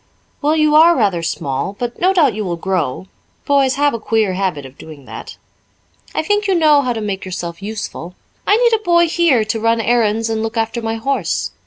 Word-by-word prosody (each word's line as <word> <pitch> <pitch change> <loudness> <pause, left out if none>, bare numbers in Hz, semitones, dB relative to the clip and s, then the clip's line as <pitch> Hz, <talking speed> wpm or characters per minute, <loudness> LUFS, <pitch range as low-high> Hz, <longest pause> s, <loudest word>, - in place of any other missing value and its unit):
"Well, 300 +2 +2
you 305 -1 +2
are 330 +3 +6
rather 195 -7 +1
small 165 +1 -3
but 240 -1 -5
no 370 +2 +3
doubt 310 - +3
you 215 +1 -3
will 175 -3 -2
grow. 180 -4 -2 0.4
Boys 275 -2 +2
have 290 +1 +2
a 230 - -3
queer 215 -3 0
habit 180 -7 -2
of 130 0 -12
doing 150 -4 -12
that. - - -9 0.8
I - - 0
think 415 +4 0
you 385 - +2
know 305 -4 +4
how 250 -3 -1
to 225 - -5
make 200 -2 -4
yourself 175 -2 -6
useful. 200 -4 -6 0.3
I 415 - +5
need 475 -1 +3
a 440 - +2
boy 345 -2 +3
here 320 -9 +2
to 225 +1 -2
run 230 +1 +1
errands 225 -1 +1
and 220 -1 -2
look 225 +1 -4
after 225 +1 -1
my 225 0 -2
horse. 270 +5 -2
225 Hz, 210 wpm, -17 LUFS, 195-300 Hz, 0.8 s, are